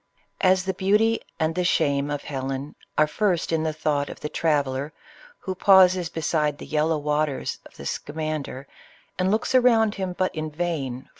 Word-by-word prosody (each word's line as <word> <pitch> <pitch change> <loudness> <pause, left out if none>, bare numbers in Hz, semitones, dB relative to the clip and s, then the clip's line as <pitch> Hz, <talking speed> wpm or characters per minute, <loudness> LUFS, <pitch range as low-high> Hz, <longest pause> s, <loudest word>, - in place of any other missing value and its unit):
As 185 0 +4
the 190 - -1
beauty 210 +5 +2 0.2
and 160 0 +1
the 180 +2 -1
shame 145 -5 +1
of 145 -1 -3
Helen 135 0 -4 0.2
are 155 - +6
first 175 +2 0
in 160 -1 +1
the 160 0 0
thought 150 -2 -1
of - - -9
the 150 - -4
traveller 145 -3 0 0.5
who 190 - -4
pauses 185 -2 +5
beside 150 -2 0
the - - -9
yellow 155 +1 +1
waters 150 -1 -1
of - - -23
the 70 - -9
Scamander, 150 - -4 0.5
and 185 +1 +2
looks 215 +5 0
around 230 -4 +4
him, 190 -3 -3
but 185 - 0
in 155 0 -3
vain, 150 -6 -3
for. - - -30
155 Hz, 175 wpm, -24 LUFS, 145-185 Hz, 0.5 s, are